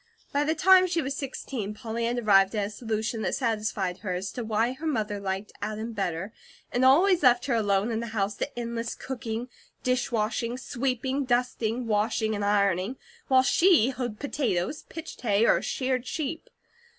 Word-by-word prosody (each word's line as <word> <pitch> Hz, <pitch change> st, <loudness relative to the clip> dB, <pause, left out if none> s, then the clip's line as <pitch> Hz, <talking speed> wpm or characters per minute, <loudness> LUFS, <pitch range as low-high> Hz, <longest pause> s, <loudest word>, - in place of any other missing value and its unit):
By 285 Hz, +1 st, +2 dB
the 315 Hz, +2 st, +1 dB
time 370 Hz, +2 st, +6 dB
she 345 Hz, -1 st, 0 dB
was 275 Hz, -3 st, -2 dB
sixteen, 255 Hz, -6 st, -5 dB
Polly 230 Hz, 0 st, -3 dB
had 240 Hz, +1 st, -1 dB
arrived 195 Hz, -3 st, +4 dB
at 205 Hz, -1 st, +1 dB
a -, -, -4 dB
solution 220 Hz, 0 st, -3 dB
that -, -, 0 dB
satisfied 210 Hz, -6 st, -1 dB
her 185 Hz, -2 st, -3 dB
as 185 Hz, +2 st, -4 dB
to 245 Hz, -, -5 dB
why 225 Hz, +2 st, +1 dB
her 305 Hz, +5 st, -6 dB
mother 210 Hz, -8 st, -1 dB
liked 195 Hz, +1 st, -3 dB
Adam 215 Hz, +2 st, -4 dB
better, 195 Hz, 0 st, -3 dB, 0.4 s
and 245 Hz, -, +1 dB
always 345 Hz, +8 st, +5 dB
left 245 Hz, -3 st, +4 dB
her 270 Hz, -, 0 dB
alone 205 Hz, -1 st, +1 dB
in 225 Hz, -, -1 dB
the 235 Hz, -, -4 dB
house 210 Hz, -2 st, -1 dB
to 285 Hz, -, -4 dB
endless 235 Hz, -1 st, -3 dB
cooking, 240 Hz, -2 st, -5 dB, 0.4 s
dishwashing, 240 Hz, -1 st, 0 dB
sweeping, 260 Hz, +1 st, -2 dB
dusting, 245 Hz, -1 st, 0 dB
washing, 220 Hz, 0 st, +1 dB
and 205 Hz, -1 st, -2 dB
ironing, 200 Hz, +2 st, +1 dB, 0.3 s
while 260 Hz, -2 st, +5 dB
she 315 Hz, -, +4 dB
hoed 245 Hz, -4 st, -4 dB
potatoes, 275 Hz, -, -1 dB
pitched 325 Hz, -1 st, -8 dB
hay, 215 Hz, -2 st, +3 dB
or -, -, +4 dB
sheared 255 Hz, -1 st, -1 dB
sheep. 315 Hz, +1 st, -4 dB
230 Hz, 175 wpm, -27 LUFS, 210-260 Hz, 0.4 s, time